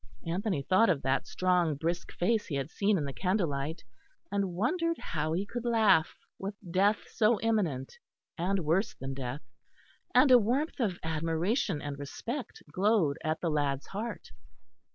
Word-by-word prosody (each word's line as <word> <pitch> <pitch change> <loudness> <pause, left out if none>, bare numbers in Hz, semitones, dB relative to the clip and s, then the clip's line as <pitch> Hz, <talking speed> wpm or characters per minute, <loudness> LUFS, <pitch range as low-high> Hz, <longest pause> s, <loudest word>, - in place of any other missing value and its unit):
Anthony 180 -2 -1
thought 190 +9 +4
of 155 -7 +1
that 135 +1 0
strong 180 -4 +1
brisk 170 +4 -2
face 215 +4 0
he 150 - -3
had 140 +3 -3
seen 205 0 +2
in 150 - -1
the 140 - -4
candlelight; 165 -6 -1 0.5
and 200 -3 0
wondered 335 - 0
how 155 -1 -2
he 185 +4 0
could 240 +3 -5
laugh, 220 -9 +3 0.2
with 200 +1 -4 0.2
death 200 +4 +2
so 220 0 +3
imminent 180 - -1 0.4
and 185 0 -1
worse 180 +8 +1
than 135 0 -5
death; 135 +1 -5 0.7
and 280 - +6
a 250 - +9
warmth 260 +10 0
of 200 -8 0
admiration 165 - 0
and 145 -1 -5
respect 235 - -6
glowed 185 -5 +2
at 155 0 -1
the 170 - 0
lad's 145 -1 0
heart. 220 +4 -6
180 Hz, 155 wpm, -30 LUFS, 150-215 Hz, 0.7 s, a